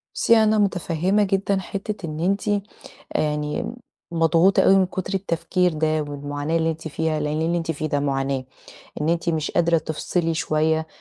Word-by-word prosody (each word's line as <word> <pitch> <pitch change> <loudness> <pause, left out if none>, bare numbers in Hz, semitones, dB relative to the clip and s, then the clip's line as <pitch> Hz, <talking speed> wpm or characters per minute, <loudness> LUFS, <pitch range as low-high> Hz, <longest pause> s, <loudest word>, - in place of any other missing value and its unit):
بُصّي 230 - +4
أنا 215 0 +3
متفهّمة 190 0 +1
جدًا 195 0 +1
حِتّة 195 +1 -5
إن 155 -1 -5
أنتِ 195 +4 +1 0.7
يعني 150 +6 -1 0.4
مضغوطة 165 +3 +4
أوي 195 - +6
من 190 -1 +4
كُتر 185 +1 -4
التفكير 180 -1 0
ده 155 0 0
والمعاناة 145 +2 -3
اللي 165 0 +2
أنتِ 160 0 -6
فيها، 155 0 -1
لأن 150 +1 -1
اللي 170 +2 +1
أنتِ 165 -1 -3
فيه 155 0 -3
ده 145 -1 0
معاناة، 135 -1 -1 0.6
إن 150 - 0
أنتِ 170 +1 0
مش 155 -2 0
قادرة 170 -1 +3
تفصِلي 165 +2 -2
شوية 160 0 +1
165 Hz, 165 wpm, -23 LUFS, 155-185 Hz, 0.7 s, أوي